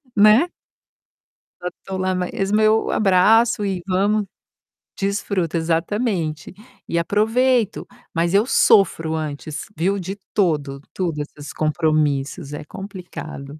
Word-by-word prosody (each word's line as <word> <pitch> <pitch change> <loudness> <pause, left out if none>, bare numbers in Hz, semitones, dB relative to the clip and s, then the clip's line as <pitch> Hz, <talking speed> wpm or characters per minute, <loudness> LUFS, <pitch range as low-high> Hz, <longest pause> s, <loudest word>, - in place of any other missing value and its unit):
né. 215 +9 +6 1.2
Já 180 - -1 0.2
tô 190 -1 -4
lá 185 0 0
mesmo, 195 +3 0
eu 220 +1 +3
abraço 215 +4 +4
e 190 -3 -2
vamos 205 +3 +1 0.7
desfruta, 195 -4 -1
exatamente. 165 0 -1 0.3
E 170 - -1
aproveito, 225 +4 +1 0.3
mas 170 +2 0
eu 205 +3 +4
sofro 165 -9 +3
antes, 155 0 -5
viu, 195 +5 0
de 190 +1 -5 0.2
todo 150 -8 0
tudo 165 -5 -2
esses 145 0 -8
compromissos, 155 -1 0
é 150 - -6
complicado. 175 -6 -8
185 Hz, 110 wpm, -21 LUFS, 160-205 Hz, 1.2 s, né